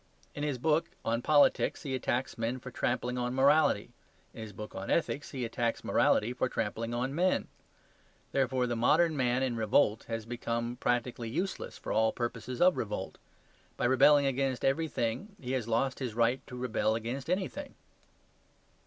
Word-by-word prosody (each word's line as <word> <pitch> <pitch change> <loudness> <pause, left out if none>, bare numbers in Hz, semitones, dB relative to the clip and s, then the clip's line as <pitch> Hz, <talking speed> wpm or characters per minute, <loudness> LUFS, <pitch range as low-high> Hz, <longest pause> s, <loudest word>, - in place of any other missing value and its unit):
In 145 - -6
his 145 -3 -1
book 155 +5 +1 0.2
on 115 +1 0
politics 145 +2 +3
he 140 -3 -3
attacks 130 0 -1
men 115 +2 -2
for 130 0 -9
trampling 125 +1 -1
on 125 +1 -2
morality; 135 -5 +3 0.4
in 115 - -9
his 110 -1 -7
book 105 +2 -8
on 95 +1 -6
ethics 145 -3 0
he 130 -4 -3
attacks 115 0 -2
morality 120 +4 +2
for 125 0 -1
trampling 115 +1 -2
on 125 +3 -2
men. 180 +4 +1 0.8
Therefore 130 -2 +1
the 120 -1 -1
modern 155 +8 +3
man 125 -1 +1
in 125 -3 -1
revolt 110 0 +2
has 115 -1 -4
become 120 0 -3
practically 120 -1 -1
useless 180 +10 -3
for - - -6
all 110 0 +3
purposes 120 +1 -4
of 180 0 +5
revolt. 105 -2 -4 0.6
By - - 0
rebelling 140 +3 +5
against 135 -2 0
everything 150 - -1
he 125 -1 -5
has 130 -4 -1
lost 120 +3 0
his 125 -5 -4
right 120 +2 +2
to 125 - -8
rebel 110 -3 0
against 120 +6 -4
anything. 195 +10 -2
125 Hz, 165 wpm, -31 LUFS, 115-140 Hz, 0.8 s, of